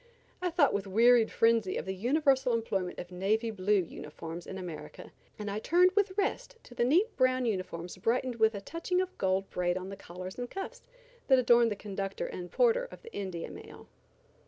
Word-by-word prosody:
I 365 - 0
thought 320 -5 +3
with 200 0 -2
wearied 230 +3 +5
frenzy 225 -4 +2
of - - -4
the 190 - -3
universal 265 +4 +2
employment 195 -5 -2
of 175 - -7
navy 215 +5 0
blue 200 -1 +2
uniforms 165 +1 -8
in 190 - -6
America, 165 -5 -8 0.3
and 210 - -6
I 205 +1 -2
turned 355 +9 +4
with 395 -1 0
rest 440 +4 -1
to - - -14
the 240 - 0
neat 355 - +3
brown 255 -1 +2
uniforms 185 -5 -3
brightened 240 +4 0
with 220 -1 +3
a 200 - -5
touching 335 - -2
of 370 0 -2
gold 190 0 +1
braid 175 0 0
on 185 +1 -6
the 195 - -6
collars 185 +2 -9
and 245 0 -4
cuffs, 420 +6 -6 0.5
that 265 - +6
adorned 240 -2 +5
the 210 - -2
conductor 195 -1 -4
and 180 -1 -7
porter - - +3
of - - -13
the 465 0 -12
India 185 -4 -5
mail. - - -12
220 Hz, 195 wpm, -30 LUFS, 190-265 Hz, 0.5 s, that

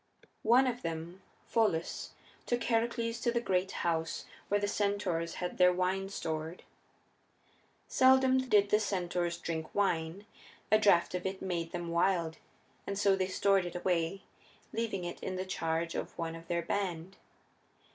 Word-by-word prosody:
One 245 +4 +5
of 245 -1 -1
them, 165 +2 -5 0.2
Pholus, 210 -8 0 0.3
took 240 -1 0
Heracles 230 0 0
to 235 - +1
the 235 - +1
great 190 -4 0
house 165 -1 -1 0.2
where 205 - +2
the 205 - 0
centaurs 200 -5 -1
had 180 0 -4
their 180 0 +7
wine 185 +2 0
stored. 160 -2 -4 1.2
Seldom 260 0 +5
did 205 -2 +4
the 210 - +5
centaurs 175 -4 -1
drink 160 -2 -5
wine; 190 -1 0 0.5
a 215 - +6
draft 190 -6 +4
of 180 +1 -2
it 190 0 -4
made 170 -3 -3
them 175 -1 -4
wild, 170 -1 +1 0.5
and 200 - -2
so 200 -1 +4
they 190 -1 0
stored 195 0 +3
it 175 - -8
away, 175 +1 0 0.5
leaving 220 -5 -2
it 175 - -5
in 185 - -3
the 185 +1 -3
charge 165 -2 -1
of - - -5
one 165 -1 -3
of 165 0 -10
their 170 -1 0
band. 185 -1 -3
185 Hz, 155 wpm, -32 LUFS, 170-205 Hz, 1.2 s, their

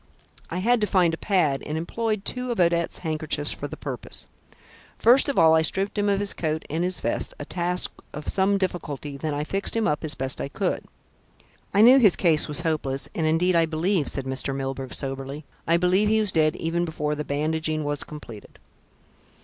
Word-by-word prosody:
I 170 - -4
had 230 +5 +2
to 210 - +2
find 180 -4 +3
a - - +1
pad 165 -7 +1
and 155 +1 -4
employed 215 +4 -2
two 250 0 -2
of 235 - -3
Odette's 170 -1 +2
handkerchiefs 155 -2 -2
for - - -4
the - - -9
purpose. - - -4 0.7
First 250 +5 +5
of 280 - -2
all 160 -1 +6
I 160 - +5
stripped 195 +5 0
him 205 -1 +1
of 200 -1 +2
his 205 -1 0
coat 155 -1 -2
and 165 +3 -1
his 180 0 +1
vest, - - -1
a - - -7
task 180 0 0 0.2
of 150 0 -8
some 195 +1 +2
difficulty, 150 -7 -4
then 150 +1 -3
I 145 - -2
fixed 195 +8 -2
him 225 -1 +1
up 150 -3 -1
as 155 -1 0
best 130 0 -3
I - - -2
could. - - -2 0.9
I 200 - +3
knew 250 +4 +8
his 210 -7 +6
case 160 -4 +2
was 150 +2 +1
hopeless, 150 -5 -1
and 160 - 0
indeed 175 +3 +2
I 165 -1 +4
believe," 165 +1 0
said 135 - 0
Mr. 130 +1 -1
Milburgh 135 -1 -4
soberly, 135 +2 -5 0.2
"I 165 +1 +4
believe 185 +4 +2
he 220 0 +3
was 210 -3 +2
dead 155 -2 +2
even 170 +1 -1
before 150 -3 -2
the 150 0 -3
bandaging 155 +2 -1
was 145 0 -1
completed. 120 -8 -11
165 Hz, 205 wpm, -25 LUFS, 150-190 Hz, 0.9 s, knew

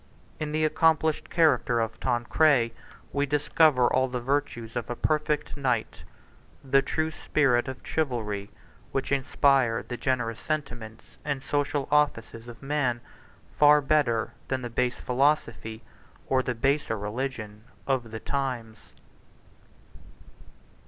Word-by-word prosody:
In 150 -1 -3
the 155 +1 +1
accomplished 160 0 +2
character 155 -7 +3
of 115 -1 -2
Tancred 120 0 +2 0.4
we 145 0 +1
discover 145 -2 +3
all 130 0 +2
the 125 -1 -3
virtues 120 -3 -2
of 120 -2 -3
a 120 - -2
perfect 150 +2 -1
knight, 125 -6 -1 0.6
54 135 - -15
the 135 - +6
true 155 +3 -1
spirit 135 -5 +1
of 130 -1 -7
chivalry, 110 -9 -2 0.4
which 135 - -2
inspired 135 -3 +2
the 120 - -4
generous 120 -4 -1
sentiments 120 -8 -5
and 140 -2 -3
social 145 -1 -1
offices 120 -6 +1
of 120 +2 -11
man 135 -4 0 0.5
far 150 0 +6
better 135 -6 +1
than 130 -1 -2
the 120 - -5
base 125 +1 0
philosophy, 125 -4 0 0.4
or 130 -1 +2
the 125 -1 -3
baser 135 -1 0
religion, 105 0 -5 0.2
of 130 -4 -1
the 110 0 -6
times. 125 -6 -3
130 Hz, 125 wpm, -27 LUFS, 115-145 Hz, 0.6 s, the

